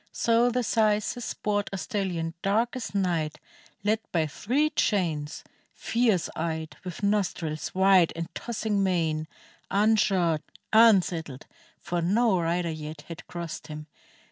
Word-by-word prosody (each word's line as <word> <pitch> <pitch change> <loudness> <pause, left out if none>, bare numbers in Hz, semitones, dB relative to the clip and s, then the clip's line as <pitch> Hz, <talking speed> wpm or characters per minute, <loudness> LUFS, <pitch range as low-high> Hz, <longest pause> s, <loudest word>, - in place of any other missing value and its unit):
So 235 +1 +3
the 250 +1 0
syces 215 +1 +1
brought 205 -1 0
A - - -3
stalHon 175 -3 -2
dark 225 +5 +1
as 245 -5 -5
night, 170 -6 0 0.4
led 215 +2 +2
by 165 -2 +2
three 265 - 0
chains, 165 - 0 0.3
Fierce 225 -7 +1
eyed, 160 -2 -3
with 180 +2 -7
nostrils 180 -7 -1
wide 190 -2 +5
and 165 0 -3
tossing 215 -3 -2
mane, 165 -5 0 0.4
Unshod, 195 -6 +3 0.3
unsaddled, 180 - +4 0.3
for 175 -1 -2
no 200 +3 +3
rider 170 0 0
yet 155 -1 -7
Had 165 - -9
crossed 170 -2 -6
him. 150 0 -7
185 Hz, 125 wpm, -27 LUFS, 165-215 Hz, 0.4 s, wide